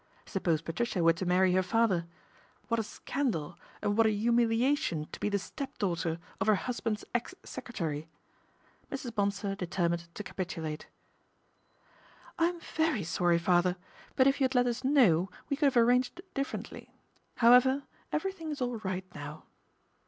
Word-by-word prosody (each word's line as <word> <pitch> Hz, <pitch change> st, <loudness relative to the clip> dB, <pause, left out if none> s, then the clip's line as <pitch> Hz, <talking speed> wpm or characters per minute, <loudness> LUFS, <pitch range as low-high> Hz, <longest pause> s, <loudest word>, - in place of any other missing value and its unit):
Suppose 170 Hz, -5 st, 0 dB
Patricia 180 Hz, +2 st, -1 dB
were 165 Hz, 0 st, +6 dB
to 180 Hz, +2 st, -4 dB
marry 180 Hz, +1 st, +4 dB
her 185 Hz, -, +4 dB
father? 185 Hz, -3 st, +1 dB, 0.6 s
What 230 Hz, -1 st, +2 dB
a -, -, 0 dB
scandal 205 Hz, -, -3 dB, 0.3 s
and 205 Hz, -, +1 dB
what 225 Hz, 0 st, +5 dB
a -, -, +3 dB
humiliation 235 Hz, -, +2 dB
to -, -, -8 dB
be -, -, 0 dB
the 200 Hz, -, +1 dB
stepdaughter 175 Hz, -, -3 dB, 0.2 s
of 195 Hz, -, 0 dB
her 215 Hz, -, +6 dB
husband's 225 Hz, 0 st, -3 dB
ex 240 Hz, +10 st, -2 dB
secretary. 165 Hz, -11 st, -4 dB, 0.8 s
Mrs. 265 Hz, -4 st, -5 dB
Bonsor 200 Hz, -2 st, 0 dB
determined 170 Hz, -2 st, -1 dB
to 210 Hz, -, -5 dB
capitulate. 165 Hz, -6 st, -5 dB, 0.8 s
" -, -, -24 dB
I'm 340 Hz, +1 st, +2 dB
very 315 Hz, -, 0 dB
sorry, 170 Hz, +1 st, +2 dB
father; 175 Hz, +1 st, +3 dB, 0.4 s
but 260 Hz, -, +5 dB
if 275 Hz, +1 st, +3 dB
you -, -, +5 dB
had 260 Hz, +1 st, -1 dB
let 245 Hz, 0 st, +5 dB
us 245 Hz, +1 st, -2 dB
know 215 Hz, -, +4 dB, 0.2 s
we 280 Hz, -, +1 dB
could 290 Hz, 0 st, +3 dB
have 255 Hz, -, 0 dB
arranged 250 Hz, +6 st, +3 dB
differently. 275 Hz, +3 st, -4 dB, 0.5 s
However, 250 Hz, +4 st, +6 dB, 0.3 s
everything 330 Hz, 0 st, -2 dB
is 295 Hz, -, -4 dB
all 245 Hz, -2 st, -1 dB
right 190 Hz, -2 st, -3 dB
no,v." 145 Hz, +1 st, -8 dB
210 Hz, 150 wpm, -31 LUFS, 175-250 Hz, 0.8 s, were